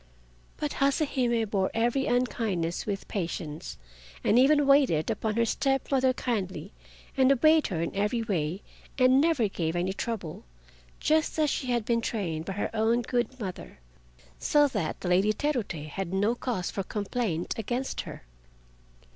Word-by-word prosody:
But 295 -1 -2
Hase 275 +3 +3
Hime 240 -5 0
bore 195 -2 0
every 240 +4 +1
unkindness 220 -9 -1
with 200 -2 -3
patience, 165 -5 -4 0.5
and 230 - +4
even 290 +2 +5
waited 275 - +4
upon 215 -1 -2
her 230 0 +3
step 270 +4 0
mother 260 -1 +3
kindly 195 -8 -3 0.4
and 265 0 +4
obeyed 310 +4 +4
her 165 -4 -2
in - - -4
every 210 +4 0
way 180 -3 -2 0.3
and 260 +1 +5
never 305 -8 +2
gave 165 -4 -2
any 180 +2 0
trouble, 195 -7 -5 0.6
just 315 +1 +1
as 305 -3 +2
she 260 - -2
had 240 -3 0
been 230 0 +1
trained 170 -9 -3
by 195 - -4
her 205 - -2
own 225 +2 +2
good 245 +1 -2
mother, 190 -5 -7 0.6
so 295 -1 +4
that 200 -11 -3
the - - -4
Lady 190 +4 +3
Terute 215 - -2
had 185 +2 -4
no 205 +4 +2
cause 235 -7 -3
for 195 - -3
complaint 200 -3 -2
against 245 +5 -2
her. - - -9
225 Hz, 155 wpm, -28 LUFS, 190-260 Hz, 0.6 s, even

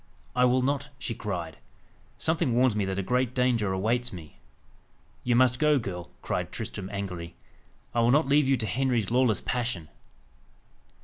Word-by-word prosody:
"I 125 0 +5
will 125 +1 +3
not!" 140 +1 -1
she 120 - -4
cried. 90 -8 -4 0.6
"Something 160 -7 +1
warns 125 -2 +4
me 105 -2 +1
that 95 0 -3
a 100 - -1
great 125 +3 0
danger 120 -6 +2
awaits 115 +6 0
me." 80 -8 -11 0.8
"You 120 -1 +2
must 125 0 +4
go, 150 -1 +4
girl," 90 -7 -5
cried - - -2
Tristram 95 -1 -5
angrily. 90 -4 -5 0.6
"I 120 - +1
will 115 0 +4
not 145 +3 +4
leave 140 0 +4
you 135 - +4
to 110 - -3
Henry's 120 -1 0
lawless 125 -3 +3
passion." 115 -10 -2
120 Hz, 165 wpm, -27 LUFS, 95-130 Hz, 0.8 s, I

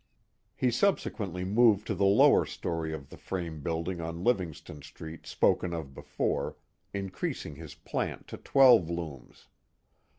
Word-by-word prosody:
He 125 - +1
subsequently 105 - 0
moved 105 +1 +4
to 110 - -1
the 100 +1 +1
lower 100 - +6
story 80 -2 -4
of 75 -4 -7
the - - -11
frame 85 -5 -5
build 80 +2 -2
ing 90 -2 -3
on 85 +1 -5
Livintjston 90 - -1
Street 80 +1 -10
spoken 85 -1 +1
of 75 -5 -6
before, - - -2 0.3
increasing 95 -5 -4
his 75 -1 -10
plant - - -4
to - - -7
twelve 125 - +5
looms. 80 -6 -7
85 Hz, 140 wpm, -29 LUFS, 80-100 Hz, 0.3 s, lower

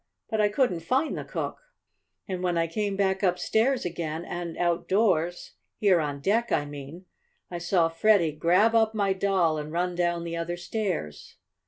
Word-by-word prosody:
But 220 -1 +1
I 210 - +3
couldn't 205 -6 +1
find 255 - 0
the - - -4
cook, - - -4 0.7
and 185 -3 -4
when 175 -2 0
I 165 - +2
came 200 +4 -2
back 190 -1 +1
upstairs 220 +7 +1
again, 165 -1 -4
and 175 -1 -5
outdoors 175 0 +1 0.2
here 195 -5 +4
on 145 -2 -3
deck, 230 +8 +1
I 145 - +1
mean 145 +5 -9 0.5
I 175 - -4
saw 175 -1 +2
Freddie 170 0 +3
grab 180 +9 +3
up 220 -1 +3
my 200 -2 +2
doll, 190 -5 +1
and 150 0 -6
run 175 +2 -1
down 175 -1 0
the 170 0 -4
other 170 +1 -3
stairs." 175 - -4
175 Hz, 170 wpm, -27 LUFS, 165-200 Hz, 0.7 s, here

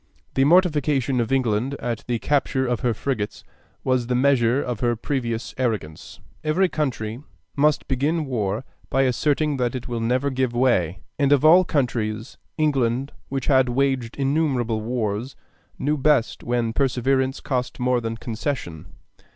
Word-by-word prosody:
The 135 - +3
mortification 150 -6 +3
of 115 - -3
England 130 0 +1
at 120 -4 -4
the 120 -1 0
capture 135 0 0
of 125 -2 0
her 125 -2 +1
frigates 110 -2 -3 0.4
was 130 -2 +1
the 125 - 0
measure 125 -1 +3
of 125 -5 -3
her 120 -1 +1
previous 115 -1 -3
arrogance.... 105 -11 -3 0.2
Every 175 +5 +2
country 120 -7 -3 0.3
must 150 +1 +2
begin 150 +5 0
war 110 -3 -2 0.2
by 135 - +2
asserting 145 +3 +1
that 125 -1 -1
it 125 - -5
will 120 -2 -3
never 125 +5 0
give 130 -2 0
way; 95 -9 +1 0.2
and 140 -1 +3
of 145 0 +4
all 175 +4 +8
countries 120 -6 -2 0.2
England, 135 -3 +1 0.2
which 135 -1 -3
had 130 -3 +4
waged 130 -2 0
innumerable 135 -6 0
wars, 115 +1 -2 0.4
knew 150 +3 0
best 140 -4 +2
when 120 -1 0
perseverance 130 +1 +1
cost 125 -2 -3
more 125 0 +1
than 115 0 -4
concession. 115 - -4
130 Hz, 150 wpm, -23 LUFS, 115-140 Hz, 0.4 s, all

